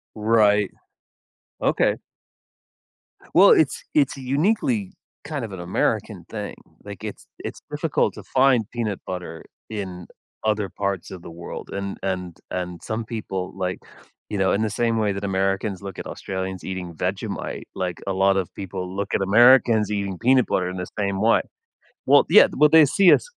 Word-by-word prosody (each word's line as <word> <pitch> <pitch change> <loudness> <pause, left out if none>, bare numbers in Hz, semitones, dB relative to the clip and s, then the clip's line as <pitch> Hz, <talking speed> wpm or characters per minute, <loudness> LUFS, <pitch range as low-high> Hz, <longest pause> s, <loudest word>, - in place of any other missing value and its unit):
Right. 105 -2 +3 0.9
Okay. - - +2 1.4
Well, 190 +4 +8
it’s 155 - +3
it’s 145 -2 +3
uniquely 195 - 0 0.3
kind 145 -4 -4
of 110 - -6
an 95 - -7
American 85 +1 -1
thing. - - -5 0.3
Like, - - -9
it’s - - -7 0.2
it’s - - -6
difficult - - 0
to - - -9
find 130 -4 +3
peanut 110 -5 -2
butter 90 -3 -6 0.3
in 95 -5 -6 0.4
other 105 -3 0
parts 100 -2 -3
of 90 -2 -8
the 85 - -10
world, - - -7
and 100 0 -4
and 90 -3 -3
and 90 -1 -4
some 110 +1 -3
people, 95 -5 -4
like, 90 -1 -2 0.5
you 105 - -3
know, 95 0 +2
in 100 - +1
the 110 - +1
same 115 -1 +2
way 105 -2 +1
that 100 +1 -5
Americans 95 +1 0
look 100 -1 -8
at - - -6
Australians 95 -1 -5
eating 90 -2 -5
Vegemite, 100 +5 -4
like 90 -2 -3
a 95 - 0
lot 95 +1 +3
of 95 - -2
people 95 -1 -5
look 100 0 -3
at - - +1
Americans 115 +1 +5
eating 100 -3 -2
peanut 130 +3 +3
butter 90 -1 0
in 90 - -6
the 90 - -4
same 100 -1 -1
way. 115 +1 +4 0.6
Well, - - +6
yeah, - - +8
well, 150 +1 +6
they 160 -2 +9
see 195 -3 +7
us - - -11
100 Hz, 165 wpm, -23 LUFS, 95-115 Hz, 1.4 s, they